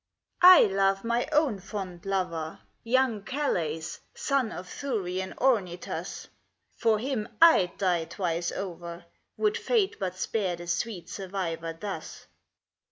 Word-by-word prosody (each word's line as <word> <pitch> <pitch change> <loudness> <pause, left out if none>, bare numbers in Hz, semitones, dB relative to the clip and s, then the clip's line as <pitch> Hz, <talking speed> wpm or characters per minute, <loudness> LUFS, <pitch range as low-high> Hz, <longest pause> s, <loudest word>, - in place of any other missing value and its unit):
L. 360 - +11
I 370 - +10
love 195 -1 +2
my 235 +1 0
own 295 -9 +2
fond 190 -2 -7
lover, 170 -5 -2 0.2
Young 240 -2 +2
Calais, 180 - -1 0.3
son 270 -5 0
of 180 - -7
Thurian 190 -8 -3
Ornytus: 200 -9 -1 0.5
For 225 -2 +2
him 235 -2 -2
I'd 320 - +6
die 175 -4 +1
twice 170 -2 -2
over, 170 -3 -6 0.3
Would 425 -1 +1
Fate 435 -6 +1
but 185 -2 -3
spare 190 -3 -1
the 175 0 -9
sweet 175 +1 -2
survivor 180 -4 -4
thus. 205 +1 -6
195 Hz, 125 wpm, -28 LUFS, 175-235 Hz, 0.5 s, L